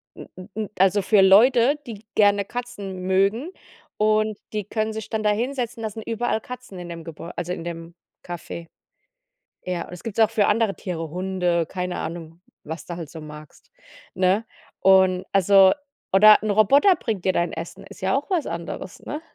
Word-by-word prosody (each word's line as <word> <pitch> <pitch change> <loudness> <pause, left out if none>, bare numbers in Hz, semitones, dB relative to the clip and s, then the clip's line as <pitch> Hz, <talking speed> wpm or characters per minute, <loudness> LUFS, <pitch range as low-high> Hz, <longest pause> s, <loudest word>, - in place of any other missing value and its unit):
n - - -10
n 185 +3 -11
n 215 -2 -3
also 195 +2 +3
für 195 +1 +4
Leute, 240 +8 +5
die 220 -2 -9
gerne 205 -1 +4
Katzen 200 -5 -6
mögen 200 - +1 0.5
und 215 0 +2 0.2
die 210 -2 -2
können 215 +1 -2
sich 220 -1 -6
dann 220 -1 -2
da 210 - +3
hinsetzen, 240 +1 -2
da 220 - -1
sind 220 +1 -8
überall 230 -1 -1
Katzen 250 -6 -9
in 175 -1 -8
dem 170 -1 -7
Gebäu 165 +1 -8
also 175 +1 -2
in 165 - -6
dem 170 0 -7 0.3
Café. 170 -1 -7 1.0
Ja, 180 -2 -3
und - - -13
das 180 - -10
gibt's 225 -2 -5
auch 220 -1 +5
für 215 -3 +2
andere 215 -1 +2
Tiere, 165 -4 -5
Hunde, 180 -1 -1
keine 180 -1 -4
Ahnung, 165 0 -7 0.2
was 160 +2 -7
du 175 - -6
halt 165 -4 -7
so 160 - -9
magst, 150 - -13 0.4
ne? 185 +4 +2 0.3
Und, 190 -1 +4
also 195 0 +6 0.4
oder 210 +2 +7
'n 215 - -1
Roboter 275 - +5
bringt 215 - -4
dir 190 - +4
dein 175 -1 0
Essen, 165 +1 -7
ist - - -14
ja 190 +4 +1
auch 285 - -5
was 345 -6 0
anderes, 170 +2 -6
ne? 300 +2 -6
195 Hz, 185 wpm, -23 LUFS, 175-220 Hz, 1.0 s, oder